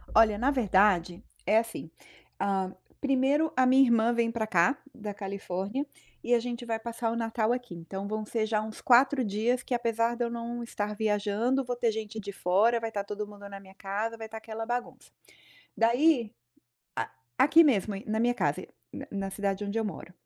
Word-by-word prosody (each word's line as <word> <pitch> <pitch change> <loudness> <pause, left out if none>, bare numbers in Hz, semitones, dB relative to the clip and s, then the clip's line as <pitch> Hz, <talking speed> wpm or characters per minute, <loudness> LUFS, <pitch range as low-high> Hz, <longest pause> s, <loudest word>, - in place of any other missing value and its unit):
Olha, 215 -2 +6
na 255 +6 +2
verdade 190 -8 +2 0.2
é 215 - +4
assim: 225 -8 -6 0.5
hã 190 -1 0 0.3
primeiro 280 +3 +2
a 255 0 +4
minha 260 +2 +6
irmã 235 -2 +3
vem 235 -1 +1
pra 225 -2 -2
cá 195 +8 +3 0.2
da 210 -3 -6
Califórnia 200 +5 -4 0.4
e 245 - +1
a 240 - +5
gente 240 0 -5
vai 225 -1 -2
passar 230 0 -3
o - - -2
Natal 225 0 0
aqui. 245 -7 -5
Então 190 +4 -6
vão 215 +1 -3
ser 220 0 -1
já 215 -1 0
uns 215 0 -7
4 260 +2 +5
dias 230 +4 0
que, - - -4
apesar 230 -1 +1
de 240 - -1
eu - - -2
não 235 0 -4
estar 210 -2 -4
viajando, 215 +5 +1
vou 245 -1 -3
ter 240 -1 +1
gente 220 0 -5
de 200 -1 -6
fora, 200 +6 +2
vai 225 0 -3
estar 205 -2 -3
todo 210 +1 -5
mundo 205 -1 -11
na 200 0 -8
minha 190 -1 -16
casa, 210 +4 -3
vai 225 -1 -7
estar 220 0 -8
aquela 220 0 -6
bagunça. 245 +1 -5 0.7
Daí 240 0 +3 1.1
A - - +7
aqui 325 +3 +7
mesmo 215 -7 +2
e 195 - -8
na 220 +1 0
minha 240 +1 +2
casa, - - -1 0.3
na - - -7
na 195 -1 -3
cidade 200 0 -2
onde 200 +2 -2
eu 225 - 0
moro. 195 -3 -6
225 Hz, 200 wpm, -29 LUFS, 205-240 Hz, 1.1 s, A